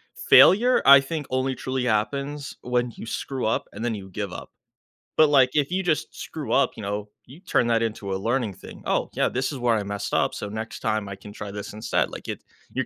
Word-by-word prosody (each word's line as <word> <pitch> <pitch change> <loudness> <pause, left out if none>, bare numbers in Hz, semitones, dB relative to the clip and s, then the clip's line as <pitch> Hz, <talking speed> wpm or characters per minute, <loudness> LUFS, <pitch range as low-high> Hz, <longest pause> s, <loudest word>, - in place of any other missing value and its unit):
failure, 250 - +6
I 140 0 +10
think, 145 +1 -4
only 130 +1 0
truly 130 0 -3
happens 140 +6 -2
when 125 0 0
you - - -8
screw 130 +3 -4
up 110 - 0
and 110 +4 -5
then 120 - 0
you 95 -3 -7
give 100 0 -5
up. - - -8 0.7
But, 155 -1 +6
like, 135 -3 +5
if 145 0 +1
you 185 +1 +1
just 160 -5 -1
screw - - -6
up, - - +3
you 110 - -7
know, 105 +1 -3 0.2
you 135 +7 -14
turn 170 -9 +1
that 115 -1 +2
into 105 -3 -3
a - - 0
learning 115 +1 -1
thing. - - -12
Oh, - - 0
yeah, - - +1
this 130 +3 -1
is 140 - -5
where 120 -2 +2
I 105 - -1
messed 100 0 -4
up, - - +2
so, - - -5
next 110 +2 -6
time 110 -2 -1
I 100 - -5
can 100 +1 -12
try 105 -1 -7
this 105 0 -7
instead. 110 +1 -1
Like, - - -9
it - - -5 0.3
you're 130 0 -2
120 Hz, 235 wpm, -24 LUFS, 105-135 Hz, 0.7 s, I